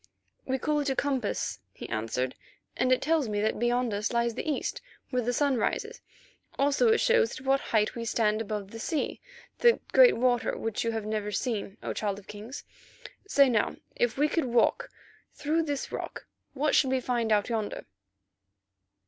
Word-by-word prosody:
"We 265 Hz, 0 st, +1 dB
call 300 Hz, +3 st, 0 dB
it 290 Hz, -1 st, 0 dB
a 265 Hz, -, 0 dB
compass," 265 Hz, -7 st, -1 dB
he -, -, -8 dB
answered, 120 Hz, +3 st, -2 dB, 0.4 s
"and 255 Hz, -, +1 dB
it 255 Hz, -, +3 dB
tells 310 Hz, -5 st, +1 dB
me 205 Hz, -1 st, -1 dB
that 215 Hz, 0 st, 0 dB
beyond 240 Hz, -1 st, +1 dB
us 205 Hz, +2 st, -1 dB
lies 235 Hz, -1 st, +1 dB
the 310 Hz, -, -4 dB
east, 290 Hz, -, -3 dB, 0.3 s
where 250 Hz, -1 st, +1 dB
the 245 Hz, +1 st, 0 dB
sun 275 Hz, +1 st, +2 dB
rises; -, -, -2 dB, 0.6 s
also 285 Hz, -, +3 dB
it 450 Hz, -, +4 dB
shows 470 Hz, -, +2 dB
at 260 Hz, -, -14 dB
what 270 Hz, +1 st, +3 dB
height 215 Hz, -2 st, +2 dB
we 235 Hz, -, -5 dB
stand 215 Hz, -1 st, +1 dB
above 205 Hz, -2 st, -4 dB
the 225 Hz, -, -8 dB
sea, 310 Hz, +5 st, -2 dB, 0.4 s
that 475 Hz, -1 st, +4 dB
great -, -, +6 dB
water 245 Hz, -1 st, +1 dB
which 225 Hz, -2 st, -2 dB
you 230 Hz, -, 0 dB
have 220 Hz, -2 st, -3 dB
never 210 Hz, -1 st, -2 dB
seen, 210 Hz, -2 st, -2 dB
O -, -, -2 dB
Child 205 Hz, -2 st, -2 dB
of 200 Hz, -, -12 dB
Kings. 215 Hz, +6 st, -8 dB, 0.6 s
Say 280 Hz, -8 st, +5 dB
now, 230 Hz, -4 st, +1 dB, 0.2 s
if 240 Hz, -1 st, 0 dB
we 295 Hz, +2 st, +3 dB
could 325 Hz, -1 st, 0 dB
walk 235 Hz, -2 st, +2 dB, 0.5 s
through 310 Hz, +3 st, 0 dB
this 290 Hz, -4 st, -3 dB
rock, -, -, -6 dB, 0.3 s
what 295 Hz, +2 st, +1 dB
should 265 Hz, -, +4 dB
we 260 Hz, 0 st, +2 dB
find 240 Hz, -3 st, -1 dB
out 205 Hz, -1 st, +3 dB
yonder?" 220 Hz, -3 st, -3 dB
240 Hz, 185 wpm, -28 LUFS, 215-280 Hz, 0.6 s, great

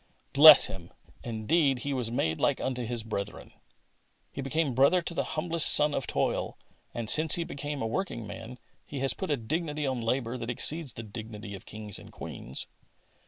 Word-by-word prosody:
Bless 150 Hz, +2 st, +10 dB
Him! 90 Hz, -2 st, -8 dB, 0.3 s
Indeed, 125 Hz, +4 st, +1 dB
He 140 Hz, -, -1 dB
was 125 Hz, -4 st, -2 dB
made 80 Hz, -9 st, -1 dB
like 140 Hz, -, +2 dB
unto 125 Hz, -2 st, -3 dB
His 120 Hz, -1 st, -3 dB
brethren." 105 Hz, -2 st, -6 dB, 0.8 s
He 140 Hz, -, -6 dB
became 140 Hz, +1 st, -1 dB
brother 140 Hz, +9 st, +4 dB
to 170 Hz, 0 st, -4 dB
the -, -, -1 dB
humblest 165 Hz, 0 st, +2 dB
son 150 Hz, 0 st, +5 dB
of 135 Hz, -, -2 dB
toil, -, -, -1 dB, 0.3 s
and 115 Hz, -2 st, -5 dB
'since 155 Hz, +5 st, +5 dB
He 170 Hz, -, -1 dB
has -, -, -10 dB
been 145 Hz, 0 st, -5 dB
a -, -, -1 dB
working 115 Hz, -, -3 dB
man. 115 Hz, +3 st, -9 dB, 0.3 s
He 145 Hz, -, -8 dB
has 135 Hz, -, +2 dB
put 190 Hz, -, -5 dB
a 145 Hz, -, +1 dB
dignity 150 Hz, +5 st, -3 dB
on 130 Hz, -3 st, -2 dB
labour 120 Hz, +1 st, -2 dB
that 115 Hz, 0 st, -5 dB
exceeds 145 Hz, +4 st, 0 dB
the 115 Hz, -, -7 dB
dignity 110 Hz, -1 st, -8 dB
of 95 Hz, -, -10 dB
kings 105 Hz, -2 st, -8 dB
and -, -, -14 dB
queens. 65 Hz, -, -6 dB
130 Hz, 190 wpm, -28 LUFS, 115-150 Hz, 0.8 s, Bless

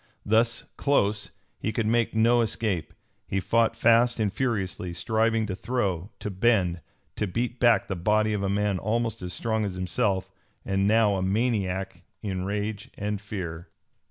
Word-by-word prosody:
Thus 115 Hz, +2 st, +2 dB
close, 105 Hz, -7 st, +1 dB, 0.3 s
he 110 Hz, -, -1 dB
could 110 Hz, 0 st, -1 dB
make 115 Hz, 0 st, +1 dB
no 120 Hz, +2 st, +4 dB
escape. 105 Hz, -7 st, -1 dB, 0.4 s
He 95 Hz, -, 0 dB
fought 115 Hz, +4 st, +2 dB
fast 115 Hz, +1 st, +4 dB
and 105 Hz, -3 st, 0 dB
furiously, 95 Hz, -8 st, -2 dB
striving 110 Hz, +4 st, +1 dB
to 100 Hz, -3 st, -3 dB
throw, 100 Hz, -6 st, -2 dB
to 105 Hz, -, -5 dB
bend, 95 Hz, -4 st, +2 dB, 0.4 s
to 105 Hz, -, 0 dB
beat 120 Hz, +6 st, -2 dB
back 120 Hz, -2 st, +4 dB
the 95 Hz, -, -2 dB
body 105 Hz, +4 st, +2 dB
of 105 Hz, -, -1 dB
a 100 Hz, -, 0 dB
man 100 Hz, -1 st, +1 dB
almost 115 Hz, +1 st, -1 dB
as 90 Hz, -1 st, -5 dB
strong 110 Hz, +3 st, -1 dB
as 100 Hz, -3 st, -3 dB
himself, 95 Hz, +1 st, -1 dB, 0.3 s
and 95 Hz, 0 st, +1 dB
now 105 Hz, -2 st, +4 dB
a -, -, -1 dB
maniac 95 Hz, -2 st, -1 dB, 0.2 s
in 95 Hz, -3 st, -2 dB
rage 105 Hz, +1 st, -3 dB
and 105 Hz, -1 st, -2 dB
fear. 90 Hz, -5 st, -6 dB
105 Hz, 160 wpm, -26 LUFS, 95-115 Hz, 0.4 s, no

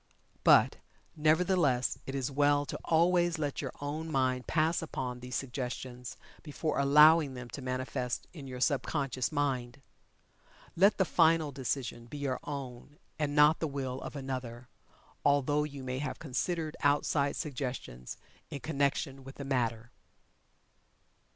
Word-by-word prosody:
But, -, -, +6 dB, 0.4 s
nevertheless, 155 Hz, -4 st, +2 dB
it 135 Hz, -, -4 dB
is 135 Hz, 0 st, -2 dB
well 145 Hz, +1 st, +3 dB
to -, -, -5 dB
always 175 Hz, +1 st, +3 dB
let 145 Hz, -3 st, -2 dB
your -, -, -4 dB
own 155 Hz, +3 st, -4 dB
mind 130 Hz, -2 st, 0 dB
pass 160 Hz, +1 st, +1 dB
upon 130 Hz, -6 st, -4 dB
these 125 Hz, +1 st, -6 dB
suggestions, 125 Hz, -1 st, -5 dB, 0.2 s
before 155 Hz, 0 st, -2 dB
allowing 150 Hz, 0 st, +6 dB
them 125 Hz, -1 st, -8 dB
to 140 Hz, -, -6 dB
manifest 130 Hz, -1 st, -3 dB
in 145 Hz, -6 st, -9 dB
your 125 Hz, -1 st, -7 dB
sub 140 Hz, 0 st, +2 dB
conscious 135 Hz, -3 st, -2 dB
mind. 135 Hz, -3 st, -1 dB, 1.0 s
Let 195 Hz, +5 st, +5 dB
the 190 Hz, -, +3 dB
final 165 Hz, -3 st, +3 dB
decision 130 Hz, -3 st, -3 dB
be 145 Hz, -, -8 dB
your 140 Hz, -3 st, -2 dB
own 140 Hz, 0 st, -7 dB, 0.2 s
and 145 Hz, -1 st, -1 dB
not 150 Hz, +1 st, +6 dB
the 160 Hz, -, -1 dB
will 135 Hz, -2 st, -4 dB
of -, -, -7 dB
another 130 Hz, -3 st, -5 dB, 0.5 s
although 145 Hz, +1 st, +3 dB
you 140 Hz, -3 st, -8 dB
may 130 Hz, 0 st, -3 dB
have 150 Hz, -, -3 dB
considered 160 Hz, +2 st, -2 dB
outside 145 Hz, 0 st, +2 dB
suggestions 125 Hz, -, -5 dB, 0.3 s
in 140 Hz, -, -6 dB
connection 140 Hz, -2 st, -1 dB
with 135 Hz, +1 st, -11 dB
the 140 Hz, -, -7 dB
matter. 120 Hz, -3 st, -1 dB
140 Hz, 140 wpm, -31 LUFS, 130-150 Hz, 1.0 s, But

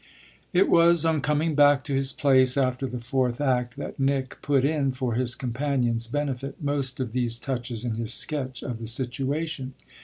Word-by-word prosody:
It 185 Hz, +2 st, +3 dB
was 170 Hz, -1 st, +5 dB
on 160 Hz, -2 st, +1 dB
coming 150 Hz, +2 st, 0 dB
back 145 Hz, -1 st, +4 dB
to 145 Hz, -, -4 dB
his 135 Hz, 0 st, +2 dB
place 130 Hz, -2 st, +3 dB
after 130 Hz, 0 st, 0 dB
the 125 Hz, -, -5 dB
fourth 125 Hz, 0 st, -1 dB
act 125 Hz, -4 st, 0 dB
that -, -, -7 dB
Nick 135 Hz, -1 st, -1 dB
put 140 Hz, -2 st, +1 dB
in, 140 Hz, -3 st, 0 dB
for 130 Hz, -2 st, -2 dB
his 125 Hz, +1 st, 0 dB
companion's 125 Hz, -2 st, -1 dB
benefit, 135 Hz, 0 st, -3 dB
most 140 Hz, -3 st, -1 dB
of 125 Hz, -4 st, -3 dB
these 120 Hz, -1 st, 0 dB
touches 120 Hz, -2 st, -4 dB
in 120 Hz, -, -1 dB
his 115 Hz, 0 st, -3 dB
sketch 130 Hz, -2 st, 0 dB
of 120 Hz, -4 st, -5 dB
the 115 Hz, -, -6 dB
situation. 135 Hz, +3 st, -2 dB
130 Hz, 180 wpm, -25 LUFS, 125-145 Hz, -, was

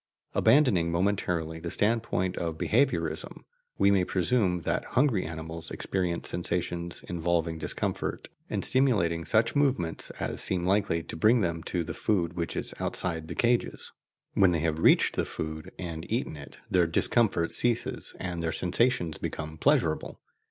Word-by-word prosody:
Abandoning 105 Hz, -, +4 dB
momentarily 85 Hz, -3 st, 0 dB
the 85 Hz, +1 st, -5 dB
standpoint 105 Hz, -3 st, +1 dB
of 80 Hz, -2 st, -3 dB
behaviourism, 130 Hz, -, 0 dB, 0.3 s
we 100 Hz, -, +4 dB
may 95 Hz, -2 st, +3 dB
presume 90 Hz, -1 st, +1 dB
that -, -, -1 dB
hungry 125 Hz, -7 st, +3 dB
animals 80 Hz, 0 st, -6 dB
experience 90 Hz, -3 st, -2 dB
sensations 85 Hz, 0 st, -2 dB
involving 85 Hz, -1 st, -1 dB
discomfort, -, -, -3 dB, 0.2 s
and -, -, -2 dB
stimulating 100 Hz, -12 st, +2 dB
such 115 Hz, +3 st, +2 dB
movements 135 Hz, -, 0 dB
as -, -, -3 dB
seem 90 Hz, -2 st, +1 dB
likely 95 Hz, -4 st, +1 dB
to -, -, -7 dB
bring 110 Hz, +8 st, +4 dB
them 85 Hz, -3 st, -1 dB
to 85 Hz, +1 st, -2 dB
the 80 Hz, 0 st, -5 dB
food 85 Hz, -5 st, 0 dB
which 85 Hz, -1 st, -3 dB
is -, -, -2 dB
outside 80 Hz, -3 st, -2 dB
the -, -, -6 dB
cages. 120 Hz, 0 st, 0 dB, 0.4 s
When 95 Hz, -3 st, +4 dB
they 80 Hz, -, 0 dB
have 80 Hz, -1 st, 0 dB
reached -, -, +4 dB
the -, -, +1 dB
food 80 Hz, 0 st, -6 dB
and 85 Hz, -1 st, -6 dB
eaten 115 Hz, -, -1 dB
it, 70 Hz, -1 st, -11 dB
their 90 Hz, -2 st, +3 dB
discomfort 85 Hz, 0 st, +2 dB
ceases 120 Hz, -1 st, -1 dB
and 90 Hz, -2 st, -4 dB
their 80 Hz, -1 st, -1 dB
sensations 90 Hz, -2 st, +1 dB
become 80 Hz, 0 st, -5 dB
pleasurable. -, -, +1 dB
85 Hz, 150 wpm, -28 LUFS, 80-105 Hz, 0.4 s, Abandoning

